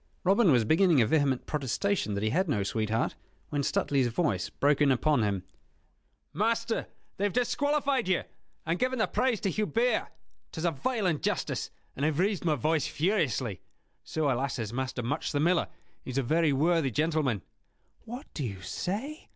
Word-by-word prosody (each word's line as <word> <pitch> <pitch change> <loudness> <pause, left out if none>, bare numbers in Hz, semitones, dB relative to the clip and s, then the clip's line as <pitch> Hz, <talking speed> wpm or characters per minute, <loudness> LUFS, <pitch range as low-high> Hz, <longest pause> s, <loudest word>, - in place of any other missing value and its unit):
Robin 195 0 +4
was 120 -4 +4
beginning 165 - +4
a 115 - +5
vehement 140 0 +1
protestation 150 - -1
that 100 - -2
he 110 - +1
had 185 +4 +1
no 105 -8 +1
sweetheart, 110 +2 -1 0.4
when 145 -1 -1
Stuteley's 140 -1 +1
voice 115 - 0
broke 145 +1 +1
in 145 -2 +5
upon 140 +1 +2
him. 100 -3 0 0.9
"Master, 230 - 0 0.3
they 195 - -2
have 205 - +1
disqualified 275 0 +1
you, 185 -2 +2 0.4
and 165 +2 -1
given 255 +1 0
the 220 - +3
prize 250 -4 0
to 195 - 0
Hubert. 230 +5 +1 0.4
'Tis 160 +1 -4
a 170 - +3
vile 215 - -2
injustice, 165 -5 -1 0.3
and 140 - -4
I - - +4
have 155 -2 0
raised 195 +2 +1
my 160 -3 +2
voice 155 +1 +1
furiously. 145 - 0 0.4
So, 160 -1 -2
alas! 135 +2 -1
has 110 -2 -4
Master 130 -1 -3
Much 125 +5 -2
the 145 - 0
Miller; 170 +3 +2 0.4
he - - -9
is 130 - -3
a 135 - +2
very 160 +4 +2
worthy 155 +1 +2
gentleman." 150 - 0 0.6
"What 245 +4 -7
do 150 - -3
you 100 -6 -5
say?" 250 - -4
155 Hz, 175 wpm, -29 LUFS, 130-200 Hz, 0.9 s, a